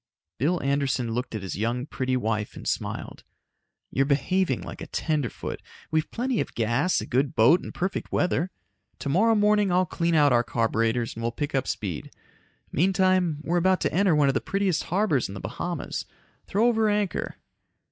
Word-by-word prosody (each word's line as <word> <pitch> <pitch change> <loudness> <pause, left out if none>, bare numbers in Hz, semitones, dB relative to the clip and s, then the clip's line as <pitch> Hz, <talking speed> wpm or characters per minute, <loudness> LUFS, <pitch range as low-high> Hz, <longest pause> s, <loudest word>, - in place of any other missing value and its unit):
Bill 165 +8 +2
Anderson 135 -4 0
looked 125 0 -3
at 105 - -4
his 95 - -4
young, 120 +5 -1
pretty 130 -3 -1
wife 110 -3 -2
and - - -8
smiled. - - -3 0.7
"You're 135 +1 +1
behaving 180 +6 +1
like - - -8
a - - -6
tenderfoot. 150 -6 -2 0.3
We've 155 -1 +1
plenty 250 0 -1
of - - -6
gas, 120 +10 +1
a - - -5
good 135 +2 0
boat 125 +11 +5
and - - -7
perfect 190 +2 -3
weather. 180 0 +1 0.5
Tomorrow 200 +11 +2
morning 210 -2 +3
I'll 180 +1 +3
clean 170 -1 0
out 145 -4 +5
our 120 0 +4
carburetors 115 0 0
and 115 - -7
we'll 115 0 -1
pick 145 +5 -4
up 135 -2 0
speed. 95 -7 -4 0.6
Meantime, 185 -2 +2
we're 170 +2 0
about 185 +1 +3
to - - 0
enter 185 -1 +3
one 145 -2 +4
of 135 - +3
the - - 0
prettiest 195 -4 0
harbors 180 - +1
in 95 - -8
the - - -6
Bahamas, 135 - -4 0.4
throw 210 +4 +2
over 225 -2 +3
anchor 205 -4 -1
150 Hz, 180 wpm, -26 LUFS, 125-185 Hz, 0.7 s, boat